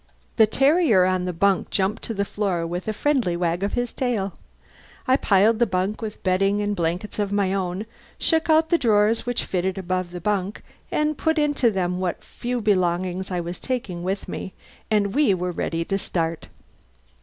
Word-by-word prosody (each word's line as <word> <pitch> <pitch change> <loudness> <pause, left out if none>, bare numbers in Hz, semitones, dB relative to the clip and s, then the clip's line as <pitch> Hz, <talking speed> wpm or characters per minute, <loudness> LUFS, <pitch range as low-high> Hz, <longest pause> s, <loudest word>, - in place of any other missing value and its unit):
The 220 - +6
terrier 270 - +4
on 185 -1 0
the 180 - -1
bunk 195 +3 +1
jumped 195 +3 0
to 225 - -3
the 200 0 0
floor 195 -5 -1
with 175 +3 -4
a - - +1
friendly 235 -7 0
wag 175 0 0
of 200 - -1
the 245 0 +1
tail. 230 -6 -2 0.7
I 260 - +5
piled 215 -2 +3
the 240 - +4
bunk 190 +3 -1
with 215 -2 -6
bedding 195 +2 +2
and 205 0 -1
blankets 175 +5 -2
of 205 -1 0
my 200 -2 +1
own, 190 +1 -2 0.3
shook 325 -1 +1
out 320 +1 +4
the 340 - +4
drawers 220 -1 +2
which 245 - -1
fitted 185 +1 -1
above 185 -1 -2
the 175 0 -7
bunk, 200 +1 -2 0.3
and 300 -1 0
put 320 0 +1
into 290 -5 +2
them 180 -3 -1
what 185 -2 -2
few 245 0 -4
belongings 185 -2 0
I 180 -2 -1
was 175 +1 -6
taking 215 -9 -3
with 190 +3 -3
me. 190 - -6 0.4
And 205 -2 +1
we 280 -10 +3
were 180 0 -2
ready 165 -1 -2
to 195 +2 -1
start. 165 -3 -2
195 Hz, 190 wpm, -23 LUFS, 180-225 Hz, 0.7 s, The